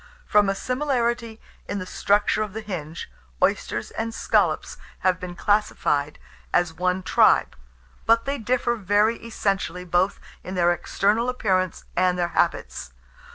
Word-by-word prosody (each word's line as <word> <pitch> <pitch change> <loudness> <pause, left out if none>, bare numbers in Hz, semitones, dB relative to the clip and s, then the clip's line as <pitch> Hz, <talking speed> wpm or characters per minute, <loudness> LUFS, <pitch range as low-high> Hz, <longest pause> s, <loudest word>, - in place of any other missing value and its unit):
From 205 -1 +4
a 195 - 0
similarity 240 -3 -1 0.3
in 205 - -3
the 185 - -4
structure 205 +3 +1
of 210 -3 -3
the 220 - -4
hinge, 170 -6 -6 0.3
oysters - - 0
and 225 0 -4
scallops - - +1 0.2
have 185 -2 +2
been 180 -1 -7
classified 175 -7 0 0.3
as 175 -2 +2
one 185 +2 -1
tribe; - - +4 0.5
but 230 0 +4
they 280 +1 -2
differ 240 +1 +1
very 210 +3 +2
essentially 195 -5 -2
both 180 +3 +1 0.2
in 185 - -6
their 175 -1 +3
external 210 +7 0
appearance 185 -7 0
and 180 0 +2
their 175 -1 0
habits. - - -1
200 Hz, 140 wpm, -24 LUFS, 180-225 Hz, 0.5 s, From